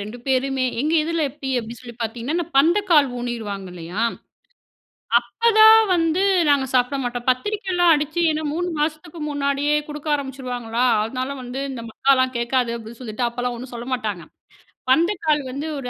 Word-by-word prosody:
2 215 Hz, +4 st, -7 dB
பேருமே! 265 Hz, 0 st, +1 dB, 0.2 s
எங்க 300 Hz, +4 st, 0 dB
இதுல 330 Hz, +1 st, -1 dB
எப்டி 275 Hz, 0 st, -8 dB
அப்டின்னு 230 Hz, 0 st, -7 dB
சொல்லி 240 Hz, -2 st, -10 dB
பார்த்தீங்கனா, 245 Hz, +10 st, -2 dB
பந்தக்கால் 330 Hz, -1 st, +4 dB
ஊணிருவாங்க 220 Hz, -6 st, -5 dB
இல்லையா? 180 Hz, +4 st, -5 dB, 1.3 s
அப்பதான் 440 Hz, -1 st, +6 dB, 0.2 s
வந்து, 330 Hz, +1 st, +1 dB, 0.3 s
நாங்க 280 Hz, -2 st, +3 dB
சாப்ட 250 Hz, +2 st, +2 dB
மாட்டோம். 245 Hz, -1 st, -4 dB
பத்திரிக்கைலாம் 360 Hz, -, +1 dB
அடிச்சு, 300 Hz, +3 st, -1 dB
என்ன 310 Hz, 0 st, -2 dB
3 355 Hz, +2 st, -2 dB
மாசத்துக்கு 310 Hz, +2 st, -3 dB
முன்னாடியே 285 Hz, +1 st, 0 dB
குடுக்க 300 Hz, +1 st, -7 dB
ஆரம்பிச்சுருவாங்களா 250 Hz, -4 st, -3 dB, 0.2 s
அதனால 255 Hz, +5 st, -3 dB
வந்து, 250 Hz, +2 st, -5 dB
இந்த 250 Hz, -3 st, -6 dB
மக்காலாம் 260 Hz, +1 st, +2 dB
கேட்காது, 235 Hz, 0 st, 0 dB
அப்டி 225 Hz, +1 st, -11 dB
சொல்ட்டு, 240 Hz, 0 st, -2 dB
அப்பலாம் 245 Hz, +1 st, -3 dB
ஒண்ணும் 250 Hz, +2 st, -9 dB
சொல்ல 235 Hz, +1 st, -7 dB
மாட்டாங்க. 210 Hz, -8 st, -4 dB, 0.7 s
பந்தகால் 320 Hz, -1 st, +2 dB
வந்து 280 Hz, +4 st, -5 dB
ஒரு 250 Hz, -2 st, -5 dB
265 Hz, 145 wpm, -22 LUFS, 240-310 Hz, 1.3 s, அப்பதான்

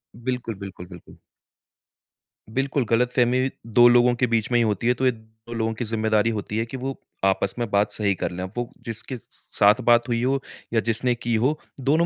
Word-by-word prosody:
बिल्कुल, 120 Hz, -1 st, -3 dB
बिल्कुल, 95 Hz, -2 st, -9 dB
बिल्कुल। 90 Hz, -2 st, -13 dB, 1.3 s
बिल्कुल, 135 Hz, +2 st, 0 dB
गलतफ़हमी 125 Hz, +2 st, +2 dB, 0.2 s
2 120 Hz, +2 st, +6 dB
लोगों 120 Hz, 0 st, +5 dB
के 125 Hz, +1 st, +1 dB
बीच 115 Hz, 0 st, 0 dB
में 120 Hz, -, +4 dB
ही -, -, +4 dB
होती 110 Hz, 0 st, 0 dB
है 125 Hz, -, +5 dB
तो 130 Hz, +2 st, -2 dB
ये 130 Hz, -, +5 dB
2 110 Hz, 0 st, -13 dB
लोगों 115 Hz, -1 st, -1 dB
की 115 Hz, +2 st, -4 dB
ज़िम्मेदारी 110 Hz, 0 st, +1 dB
होती 105 Hz, -1 st, -3 dB
है 115 Hz, -, 0 dB
कि 130 Hz, +3 st, -7 dB
वो 135 Hz, +1 st, -4 dB, 0.3 s
आपस 95 Hz, 0 st, +1 dB
में 120 Hz, -2 st, -2 dB
बात 100 Hz, +1 st, +2 dB
सही 100 Hz, -2 st, +1 dB
कर -, -, -3 dB
लें। 90 Hz, +1 st, -5 dB
वो 120 Hz, 0 st, -2 dB, 0.2 s
जिसके 115 Hz, +3 st, -5 dB
स -, -, -17 dB, 0.4 s
साथ 105 Hz, +5 st, +5 dB
बात 120 Hz, 0 st, +4 dB
हुई 120 Hz, 0 st, 0 dB
हो 135 Hz, +2 st, +1 dB, 0.3 s
या 115 Hz, -, +4 dB
जिसने 115 Hz, +3 st, +1 dB
की 120 Hz, -1 st, -2 dB
हो, 130 Hz, +8 st, +1 dB, 0.2 s
दोनों 155 Hz, +6 st, +3 dB
115 Hz, 205 wpm, -24 LUFS, 110-125 Hz, 1.3 s, 2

